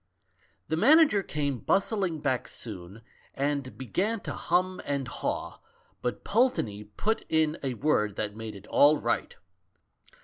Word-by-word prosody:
"The 160 - 0
manager 290 - +6
came 145 -7 -2
bustling 195 - 0
back 130 -4 0
soon, 100 0 -9 0.3
and 140 -1 -2
began 195 - -1
to - - -5
hum 185 +2 0
and 140 -2 -2
haw, - - -3 0.4
but 125 - -3
Pulteney 120 - +1
put 205 - -2
in 160 0 +2
a 130 -3 -2
word 105 -7 +1
that 105 -1 -3
made 110 -1 -6
it 100 +1 -11
all 150 +6 +5
right. - - -1
145 Hz, 135 wpm, -28 LUFS, 115-185 Hz, 0.4 s, manager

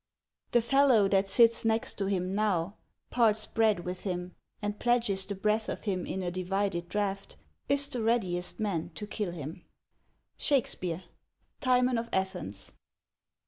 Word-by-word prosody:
XII. - - -57
The 240 - +5
fellow 250 -4 +4
that 195 0 +2
sits 230 +1 +5
next 225 0 0
him 190 -1 -1
now, 200 -2 0 0.4
parts 220 -3 +3
bread 220 -5 +2
with 180 +1 -5
him, 180 -2 -4 0.3
and 205 -1 -4
pledges 230 -6 +1
the 200 - -3
breath 215 +3 0
of - - -5
him 185 -4 -2
in 190 - -3
a 175 - -2
divided 185 -1 -2
draught, 195 - -2 0.3
is 280 0 +6
the 255 -5 -1
readiest 190 -6 0
man 190 -7 -1
to 210 - -5
kill 210 -2 -3
him. 165 0 -7 0.4
— - - -46
SHAKESPEARE: 185 - 0 0.6
Timvn 250 -2 +3
of 230 0 -5
Athens. 175 - -3
200 Hz, 150 wpm, -30 LUFS, 180-225 Hz, 0.6 s, is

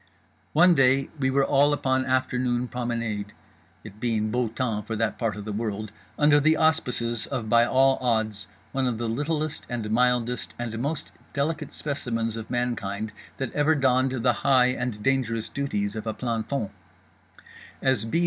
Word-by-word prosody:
One 175 +3 +6
day 135 -2 +3
we 130 -1 +2
were 135 +1 +3
all 145 +1 +4
upon 130 -2 0
afternoon 125 -1 0
promenade, 115 -4 -3 0.5
(it 100 - -11
being 110 -2 0
beau 125 0 +1
temps 110 -2 -2
for 115 - -2
that 110 0 -1
part 115 -3 0
of 105 -1 -7
the 105 - -4
world), 105 -1 -3 0.3
under 145 0 +5
the 155 +2 +3
auspices 125 -8 +1
of 120 -6 -3
by 120 +1 +5
all 135 +1 +4
odds 110 -4 0 0.2
one 135 -1 0
of 120 -3 -1
the 120 0 -2
littlest 150 +5 -2
and 115 -4 -3
mildest 125 0 +1
and 115 -2 -4
most 145 +5 -3 0.2
delicate 150 +1 -2
specimens 115 -6 -2
of 110 -1 -7
mankind 110 -4 -2 0.3
that 135 -3 -3
ever 150 +2 +3
donned 130 -1 +3
the 125 - +4
high 125 -2 +5
and 120 -5 -4
dangerous 120 -5 +1
duties 105 -7 -2
of 110 0 -5
a 110 - -2
planton. 115 -1 -2 1.1
As 130 -5 +2
B. 115 +9 0
125 Hz, 165 wpm, -26 LUFS, 110-135 Hz, 1.1 s, One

